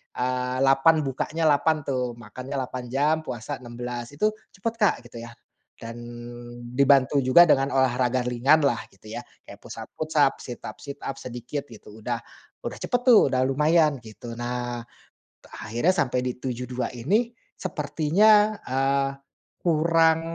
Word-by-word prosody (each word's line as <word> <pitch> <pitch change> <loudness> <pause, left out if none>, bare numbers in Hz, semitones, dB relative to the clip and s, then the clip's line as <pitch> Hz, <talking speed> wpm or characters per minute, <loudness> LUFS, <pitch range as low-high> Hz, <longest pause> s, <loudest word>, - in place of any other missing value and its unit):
eee, 125 0 -1
8 135 +4 +5
bukanya 140 +4 -2
8 155 +2 +3
tuh 125 -3 -1
makannya 130 +3 -8
8 130 -1 -4
jam 145 +4 +2
puasa 125 +3 -5
16 120 0 -6
itu 215 +8 +2 0.2
cepet 225 +4 -2
Kak 210 - +4
gitu 120 -1 -10
ya, 115 - -8 0.5
dan 115 +1 -8 0.7
dibantu 140 +1 +4
juga 130 +7 +7
dengan 135 0 +4
olahraga 125 -1 +2
ringanlah 125 +1 +2
gitu 105 +2 -14
ya - - -7 0.2
kayak - - -12
push - - -9
up-push 155 0 -7
up 140 -2 +5
sit 120 - -8
up-sit 140 +6 -8
up 135 0 -5
sedikit 125 +4 -6
gitu 110 -1 -13
udah 120 +1 -2 0.5
udah - - -5
cepet 245 -1 -1
tuh 245 - +7
udah 130 0 +1
lumayan 150 +1 +3
gitu 115 +1 -10
nah, 120 0 -3 0.9
akhirnya 120 +12 +1
sampai 125 -5 +1
di 125 - -1
72 125 0 -4
ini 205 - 0 0.2
sepertinya, 200 +7 +3
eee, 135 +1 +1 0.6
kurang, 165 0 +4
135 Hz, 140 wpm, -25 LUFS, 125-155 Hz, 0.9 s, juga